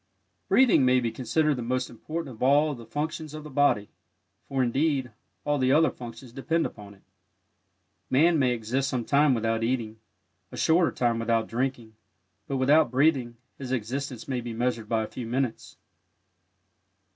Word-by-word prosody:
Breathing 255 - +5
may 130 0 +4
be 120 -2 -2
considered 130 +5 0
the - - -3
most 125 +2 -1
important 155 +4 -6
of - - -20
all 145 +4 +4
of 135 - -7
the 115 - -11
functions 155 +3 -4
of 155 - -7
the 150 - -10
body, 135 -7 +2 0.6
for, 135 -1 0
indeed, 135 0 0 0.3
all 145 -1 +1
the 130 0 +2
other 160 +3 +4
functions 120 0 -10
depend 160 +6 -1
upon 100 -2 -9
it. 95 - -26 1.1
Man 160 +4 +4
may 130 -2 +3
exist 125 +3 -1
some 125 -4 -2
time 140 0 +3
without 115 0 -1
eating; 115 -2 -2 0.5
a - - -8
shorter 165 -3 +3
time 120 -2 0
without 115 -1 0
drinking; 120 -2 -3 0.5
but 135 - -2
without 140 +2 +4
breathing 130 -3 +1 0.2
his 130 -2 -6
existence 130 +1 -4
may 130 -2 -2
be 120 -1 -6
measured 115 -2 -2
by 115 -1 +1
a - - -5
few 120 +1 -7
minutes. 125 -1 -3
130 Hz, 170 wpm, -26 LUFS, 115-145 Hz, 1.1 s, Breathing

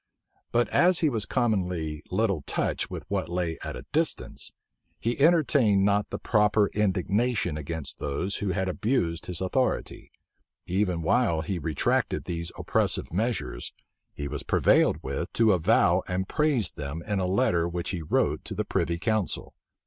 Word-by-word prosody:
But 120 0 +2
as 180 0 +4
he 160 - +4
was 110 -6 -1
commonly 90 - -1
little 100 -4 +1
touched - - -1
with - - -6
what 80 - -2
lay 85 -2 -2
at - - -5
a 60 - -9
distance, - - -1 0.5
he 120 +3 -2
entertained 140 - +4
not 100 0 +2
the - - -4
proper 105 -2 +2
indignation 100 -1 +1
against 75 0 -5
those 80 +8 -2
who 100 - -2
had 95 0 -1
abused 90 -4 -1
his 90 -1 -4
authority: 125 +8 -1 0.5
even 90 -2 0
while 85 -3 +2
he 90 +3 -3
retracted 75 -2 0
these 85 0 -3
oppressive - - 0
measures, 110 - -2 0.4
he 70 - -5
was 75 0 -4
prevailed - - +3
with - - -3
to 110 -2 +4
avow 85 -4 +3
and 95 +1 -2
praise 145 - +1
them 75 +3 -6
in 105 -2 -1
a 90 - 0
letter 85 -3 +2
which 85 +2 -3
he 90 -4 -3
wrote 75 - 0
to - - -4
the - - -1
privy 85 +1 0
council. 110 +1 -1
95 Hz, 155 wpm, -27 LUFS, 85-110 Hz, 0.5 s, as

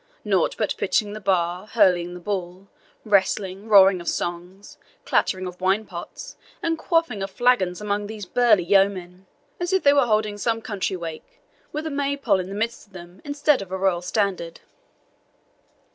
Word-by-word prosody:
nought - - +1
but - - -1
pitching 210 -2 0
the 215 - -6
bar, 185 -1 0
hurling 180 -6 +2
the - - -8
ball, 185 0 -5 0.4
wrestling, 195 0 +1
roaring 195 -3 +6
of 170 - -11
songs, 175 +3 -5 0.3
clattering 185 -1 +1
of 180 0 -8
wine 195 +4 +1
pots, 175 -3 -9 0.3
and 330 -1 -1
quaffing 330 - 0
of 195 - -3
flagons 195 -5 +1
among 205 0 -2
these 210 -2 -7
burly 215 -1 +3
yeomen, 190 -1 +1 0.3
as 350 +1 -2
if 380 0 +2
they 285 - +6
were 280 -4 +3
holding 215 -1 0
some 225 +1 0
country 205 -4 -3
wake, 170 - -8 0.3
with 305 +1 -4
a 315 - -3
Maypole 280 -7 0
in 185 0 -5
the 195 - -6
midst 225 +1 -3
of 200 - -29
them 175 +1 -12
instead 290 -2 +1
of 190 -2 -9
a 190 - -2
royal 190 -2 +1
standard." 185 -3 -2
200 Hz, 170 wpm, -23 LUFS, 185-225 Hz, 0.4 s, roaring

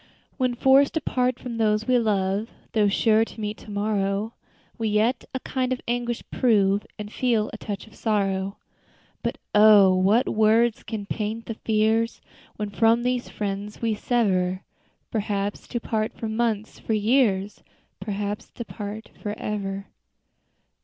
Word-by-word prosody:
_ - - -29 0.3
"When 255 -2 +1
forced 270 +4 +4
to 320 - +1
part 250 -2 0
from 235 -2 -6
those 215 -1 +2
we 250 0 +3
love, 205 0 0 0.2
Though 210 -2 +3
sure 215 +2 +3
to 225 - -9
meet 210 0 -3
to - - -13
morrow; 205 +1 -1 0.5
We 225 - 0
yet 215 +4 +1
a - - -1
kind 260 -1 -2
of 255 - 0
anguish 240 0 -2
prove 205 -5 +2
And 210 0 -7
feel 230 -5 +1
a - - -5
touch 205 -2 -5
of 220 - -18
sorrow. 195 -3 -1 0.6
But - - -2 0.2
oh! 210 -3 +7
what 200 +6 +3
words 220 +1 +3
can 215 -2 -5
paint 220 +2 -3
the 225 - -4
fears 220 +1 +1 0.4
When 210 -1 -4
from 225 +3 +3
these 250 0 -1
friends 205 0 -4
we 225 -2 0
sever, 190 -5 0 0.5
Perhaps 205 -2 -2
to 240 - -3
part 220 -1 -2
for 225 - -5
months 220 -1 -1
for 225 - -2
years 210 -3 +2 0.4
Perhaps 205 0 -4
to 235 - -5
part 210 +1 -7
forever." 200 -2 -4
215 Hz, 155 wpm, -25 LUFS, 205-230 Hz, 0.6 s, oh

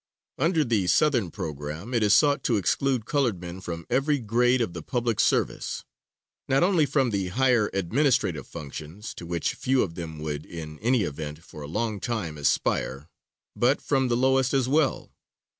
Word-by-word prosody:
Under 165 +2 +3
the 110 -6 +1
Southern 120 - +3
program 75 - -6
it 115 - +2
is 105 -1 +5
sought 145 -2 +3
to 115 - +2
exclude 125 +4 0
colored 125 -9 0
men 90 +1 -8
from 85 -2 -6
every 145 +2 +2
grade 120 +2 +2
of 115 -8 -1
the 85 - -6
public 120 +4 -1
service; - - 0 0.6
not 135 +3 +3
only 175 -5 +3
from 135 -3 +1
the 100 -3 -1
higher 120 +1 +2
administrative 120 - +1
functions, 80 +6 -8
to 85 - -9
which 85 0 -1
few 130 0 +1
of 85 - -4
them 80 -2 -7
would 75 -1 -4
in 80 -2 -8
any 120 0 +2
event, 75 -1 -5
for 75 - -11
a 70 - -6
long 105 +5 -2
time 105 -10 -3
aspire, 70 +1 0 0.5
but 130 +4 +2
from 135 -2 +1
the 120 -1 +1
lowest 130 +1 +2
as 130 -2 +2
well. 145 0 +1
110 Hz, 175 wpm, -26 LUFS, 85-130 Hz, 0.6 s, is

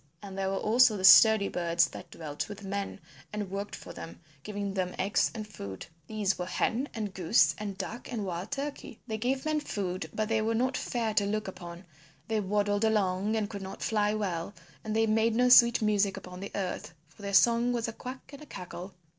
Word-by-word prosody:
And 195 -1 -8
there 195 0 -1
were 195 - -1
also 225 +1 +4
the 185 - -5
sturdy 215 +1 +8
birds 170 -1 +2
that - - -10
dwelt 150 +1 -5
with 205 0 -8
men 200 0 -4 0.3
and 210 -3 -4
worked 200 +1 -4
for - - -10
them, 165 - -9 0.2
giving 205 +2 -4
them 185 -2 -2
eggs 195 +2 +2
and 215 -2 -5
food. 100 - -8 0.2
These 210 -3 -1
were 180 - -3
Hen 245 +8 0
and 210 -4 -3
Goose 160 -4 +3
and 200 -2 -5
Duck 220 +6 -6
and 220 -4 -3
Wild 180 +2 -4
Turkey. 280 -4 -5
They 220 -2 -4
gave 260 +4 -1
men 310 -1 +1
food, 195 -9 -4
but 215 0 -1
they 220 0 +1
were 225 +1 0
not 255 +3 +1
fair 230 -3 -1
to 205 -1 +2
look 215 0 -2
upon; 175 -1 -9 0.4
they 220 -1 0
waddled 205 +1 0
along 205 -1 +1
and 215 -2 0
could 200 -2 -7
not 190 0 -7
fly 210 -1 +1
well 195 -2 -3 0.3
and 215 0 -3
they 225 0 +3
made 220 +1 +2
no 250 +1 +4
sweet 235 -2 +7
music 205 -2 +2
upon 180 0 -9
the 200 - -6
earth, 185 -2 -4
for 160 - -19
their 200 -1 -2
song 235 +2 +5
was 235 -2 -1
a 230 - -5
quack 255 +3 -9
and 280 - -10
a 300 - -11
cackle. 180 -1 -8
205 Hz, 215 wpm, -29 LUFS, 190-225 Hz, 0.4 s, sturdy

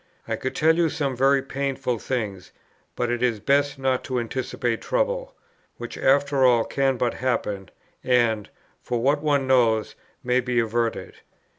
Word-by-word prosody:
I - - -1
could 130 - -4
tell 160 +1 +4
you 170 -2 +3
some 140 -3 -2
very 135 +2 +3
painful 135 -3 -2
things; 105 -8 -4 0.4
but 120 -1 -1
it 120 0 -2
is 120 -4 +1
best 140 +5 +1
not 130 -1 0
to 130 -1 -1
anticipate 120 -1 -2
trouble, - - -1 0.4
which - - -7
after 140 0 +2
all 120 -3 +5
can 135 -2 0
but 120 -1 0
happen, 105 -6 -2 0.3
and, 115 -4 +2 0.3
for 120 -1 -2
what 140 +5 +2
one 145 -3 +1
knows, 115 -4 +2 0.3
may 125 0 +2
be 125 -1 -2
averted. 115 0 -2
130 Hz, 155 wpm, -24 LUFS, 120-140 Hz, 0.4 s, all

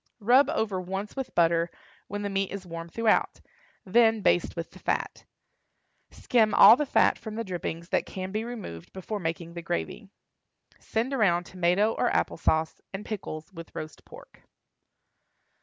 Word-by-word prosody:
Rub 245 +6 +5
over 205 -4 -1
once 195 +3 -5
with 265 -2 -5
butter, 170 0 +3 0.4
when 205 +1 -4
the 205 - -2
meat 195 0 0
is 195 -1 -6
warm 165 -1 -7
throughout; 225 +4 +1 0.5
then 225 +2 +4
baste 175 - +2
with 170 -1 -5
the - - -14
fat. - - -2 0.8
Skim 220 -4 +1
all 210 +3 +10
the 295 +2 -2
fat - - +3
from 220 -2 -7
the 230 - -2
drippings 170 -3 -5
that - - 0
can 185 0 -5
be 215 +2 -2
removed 215 - -8
before 200 +3 -5
making 165 -1 -4
the 170 - -6
gravy. 80 - -4 0.7
Send 235 +5 -2
around 185 -9 +2
tomato 180 +4 +1
or 245 - +1
apple - - 0
sauce, 160 -1 0
and 195 +2 -6
pickles, 185 -5 -6
with 165 -1 -11
roast 155 0 -7
pork. - - -15
195 Hz, 160 wpm, -27 LUFS, 170-220 Hz, 0.8 s, all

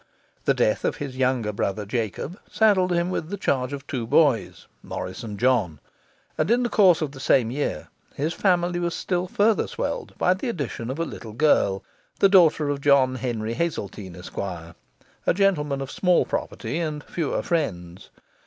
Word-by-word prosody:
The - - +3
death - - +1
of - - 0
his 135 -3 -6
younger 130 -5 0
brother 100 +1 -2
Jacob 115 - -3
saddled 195 -5 +3
him 175 +1 +1
with 160 -3 -3
the 200 - -4
charge 130 -7 0
of 140 0 -6
two 125 -5 -4
boys, 140 -2 +2 0.2
Morris - - -6
and 105 -3 -7
John; 115 - +2 0.6
and 155 - +1
in 240 +2 +3
the 240 - 0
course 185 -8 +5
of 145 - -3
the 135 - -11
same 120 -3 +3
year 145 +3 -3 0.3
his 155 +4 -1
family 175 -2 +1
was 170 -1 -1
still 180 -1 -1
further 210 +4 +2
swelled - - -4
by 180 - +3
the 190 +7 -4
addition 140 - -4
of 130 - -3
a 165 - -1
little 110 -8 -8
girl, 110 -7 +2 0.3
the 195 - +5
daughter 165 -6 +5
of 140 -1 -2
John 140 -2 +4
Henry 115 -3 -3
Hazeltine, 105 - -4
Esq., 90 +1 -11
a 85 -3 -5 0.6
gentleman 150 -8 +1
of 135 +1 -5
small 180 -2 +3
property 125 +8 -3
and 155 -3 -3
fewer 165 -5 -2
friends. 90 - -3
140 Hz, 175 wpm, -24 LUFS, 115-175 Hz, 0.6 s, course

